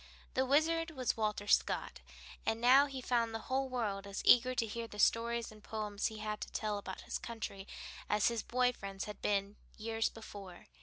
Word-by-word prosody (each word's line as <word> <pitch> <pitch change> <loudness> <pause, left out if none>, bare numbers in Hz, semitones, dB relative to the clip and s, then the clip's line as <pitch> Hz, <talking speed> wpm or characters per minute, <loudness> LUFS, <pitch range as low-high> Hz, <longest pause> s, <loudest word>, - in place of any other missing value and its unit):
The 260 0 +1
Wizard 325 +4 +3
was 255 -8 -1
Walter 210 -2 -1
Scott, - - +2 0.4
and 225 0 0
now 260 +4 +7
he 270 -2 -6
found 235 -2 +1
the 225 - -5
whole 265 0 +1
world 205 -6 -2
as 200 0 -4
eager 250 +1 +6
to 235 - +2
hear 230 +1 -4
the 210 - -11
stories 230 +2 +2
and 215 -1 -15
poems 210 -2 -2
he 220 - -6
had 215 0 -4
to - - -5
tell 210 -2 -1
about 190 -2 -7
his - - -4
country 210 -4 -6 0.4
as 210 -1 +3
his 235 -1 0
boy 250 0 +2
friends 195 -3 -6
had 210 - -8
been 200 0 0 0.2
years 225 +1 0
before. 200 -5 -10
225 Hz, 195 wpm, -35 LUFS, 210-245 Hz, 0.4 s, now